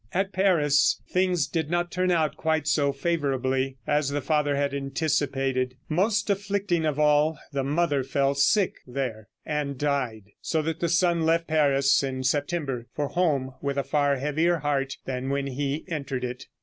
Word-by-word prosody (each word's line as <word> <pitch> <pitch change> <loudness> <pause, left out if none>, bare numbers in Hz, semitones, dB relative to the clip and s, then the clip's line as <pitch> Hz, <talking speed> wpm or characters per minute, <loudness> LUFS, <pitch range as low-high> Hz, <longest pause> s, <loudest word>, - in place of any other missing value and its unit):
At 195 +1 0
Paris 165 -7 +3
things 180 -4 +2
did 160 -1 -2
not 175 0 0
turn 185 0 0
out 160 -4 +1
quite 160 -2 0
so 145 -1 +2
favorably 135 -4 -1
as 150 -1 +1
the 145 +1 -1
father 150 -1 +1
had 140 0 0
anticipated. 135 -2 -1
Most 205 +6 +1
afflicting 195 -4 0
of 150 -2 -1
all, 150 +1 +3 0.2
the 135 -1 0
mother 145 -1 +1
fell 135 +1 +1
sick 185 +8 +2
there, 120 -5 -4 0.2
and 145 -2 -2
died, 125 -8 -2
so 160 -1 -1
that 160 +1 -3
the 170 - 0
son 170 0 +2
left 165 +1 +2
Paris 140 -4 +3
in 130 -2 -3
September 140 -3 -1
for 145 -1 -1
home 140 -7 0
with 140 0 -2
a 140 - +1
far 140 +1 +1
heavier 155 +5 +1
heart 140 -2 -1
than 130 0 -3
when 140 0 -1
he 140 +3 -3
entered 140 -6 -3
it. 125 +1 -5
145 Hz, 165 wpm, -26 LUFS, 135-165 Hz, 0.2 s, Paris